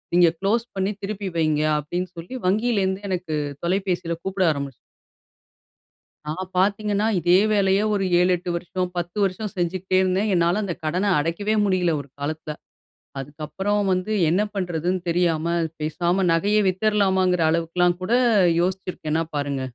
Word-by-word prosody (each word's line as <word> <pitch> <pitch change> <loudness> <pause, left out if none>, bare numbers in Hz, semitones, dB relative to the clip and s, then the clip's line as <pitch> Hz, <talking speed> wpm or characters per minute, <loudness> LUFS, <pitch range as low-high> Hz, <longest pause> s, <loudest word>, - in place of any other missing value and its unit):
நீங்க 175 -2 +6
குளோஸ் 225 +5 0
பண்ணி 195 +2 0
திருப்பி 200 -1 -3
வைங்க." 155 -2 +2 0.2
அப்படீன்னு 175 +5 -4
சொல்லி 175 +10 -7
வங்கியிலிருந்து 200 -2 +1
எனக்கு 180 -4 -3 0.3
தொலைபேசியில 180 -2 -1
கூப்பிட 190 -1 0
ஆரம்பிச்சி 140 -3 -4 1.5
நான் 185 +4 -4
பார்த்தீங்கன்னா, 205 +2 +1
இதே 175 +2 +4
வேலைய 195 -1 +3
ஒரு 195 -2 0
7, 180 +1 +3
8 175 +1 -6
வருஷம், 180 +1 -3
10 175 +3 -4
வருஷம் 195 +2 -2
செஞ்சுகிட்டே 185 +2 0
இருந்தேன். 190 +3 +1
என்னால 175 +4 +2
அந்த 180 -4 -2
கடனை 180 +6 0
அடைக்கவே 185 +8 -1
முடியல 185 -3 +2
ஒரு 140 - -17
காலத்தில. 150 +1 -4 0.7
அதுக்கப்பறம் 175 +9 -2
வந்து 185 +4 -1 0.2
என்ன 190 +5 +2
பண்ணுறதுன்னு 180 -1 -1
தெரியாம, 170 -2 +1 0.3
பேசாம 175 +4 0
நகைய 205 +6 +2
வித்துறலாமாங்கிற 190 -3 +2
அளவுக்குலாம் 175 +2 +1
கூட 215 - -2 0.5
யோசிச்சிருக்கேன்னா 180 -4 -1
பாருங்க. 140 -2 -2
185 Hz, 130 wpm, -23 LUFS, 170-195 Hz, 1.5 s, நீங்க